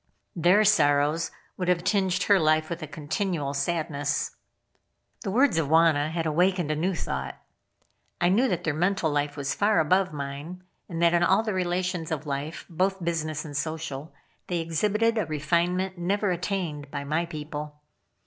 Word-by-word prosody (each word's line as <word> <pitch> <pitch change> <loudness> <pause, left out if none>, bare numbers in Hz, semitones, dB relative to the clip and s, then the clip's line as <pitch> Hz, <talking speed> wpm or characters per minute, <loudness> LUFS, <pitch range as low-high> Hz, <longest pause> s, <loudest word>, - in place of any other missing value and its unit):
Their 180 +5 +4
sorrows 155 -5 +3 0.3
would 180 - -2
have 180 -1 +2
tinged 185 -2 +1
her 200 -2 +4
life 155 0 +2
with 170 +1 -4
a 155 - -5
continual 155 0 -2
sadness. 145 -2 -1 0.9
The 205 - -3
words 235 - +3
of 155 - 0
Wauna 155 -1 +4
had 165 0 -2
awakened 175 +1 +2
a - - 0
new 180 +5 0
thought. 65 - -4 0.8
I 175 - +3
knew 230 +8 +3
that 180 -7 -1
their 155 - 0
mental 175 0 +1
life 145 0 -1
was 140 -1 -1
far 205 -2 +2
above 185 +4 +2
mine, 145 +5 -6 0.3
and 170 -1 -2
that 170 0 +5
in 175 - +3
all 190 +5 +4
the 215 -2 -2
relations 180 -2 -1
of 160 -1 -3
life, 145 +3 -4
both 185 +2 -1
business 155 -3 -2
and 145 -2 -8
social, 155 0 -4 0.4
they 175 - -1
exhibited 210 +8 +1
a 195 - -1
refinement 175 +4 0
never 200 +3 0
attained 175 -5 -3
by 140 0 -4
my 155 +4 -1
people. 150 -1 -6
165 Hz, 170 wpm, -26 LUFS, 150-185 Hz, 0.9 s, that